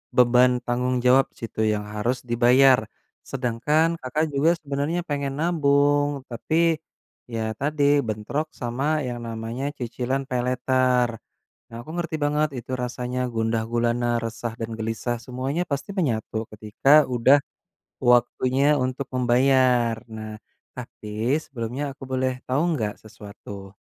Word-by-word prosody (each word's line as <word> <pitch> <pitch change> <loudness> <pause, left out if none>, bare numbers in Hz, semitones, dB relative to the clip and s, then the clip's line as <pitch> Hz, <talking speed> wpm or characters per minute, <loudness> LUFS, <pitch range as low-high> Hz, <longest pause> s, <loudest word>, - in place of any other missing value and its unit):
beban 125 0 +5
tanggung 125 +1 0
jawab 130 +2 +6
situ 110 -1 -3
yang 105 -1 0
harus 120 +5 0
dibayar. 125 +2 +5 0.4
Sedangkan 135 +5 +1 0.2
Kakak 155 +5 0
juga 155 +5 +4
sebenarnya 145 +3 -2
pengen 140 -1 -3
nabung 145 -3 +2
tapi, 160 +7 +1 0.6
ya 110 -1 -2
tadi 145 +1 0 0.2
bentrok 110 +9 -2
sama 135 +6 0
yang 120 -1 -4
namanya 115 +5 -4
cicilan 130 +2 -2
paylater. 125 -1 +1 0.6
Nah 115 - -9
aku 120 - -13
ngerti 170 -2 -2
banget 150 +1 +1
itu 120 - -10
rasanya 125 +1 -3
gundah 115 0 0
gulana, 120 0 +1 0.2
resah, 115 0 -4
dan 115 0 -4
gelisah 115 +2 -2
semuanya 130 +7 -2
pasti 140 +6 -3
menyatu 115 - -1
ketika 105 +5 -3 0.2
udah 130 +3 +4 0.6
waktunya 130 +4 +3
untuk 130 +1 -3
membayar, 125 -1 +3
nah 110 -1 -7 0.4
tapi 115 +1 -3
sebelumnya 120 +1 -5
aku 135 - -20
boleh 130 0 0 0.2
tahu 135 +4 +1
enggak 110 -9 -2
sesuatu? 100 -2 -11
125 Hz, 125 wpm, -24 LUFS, 115-140 Hz, 0.6 s, jawab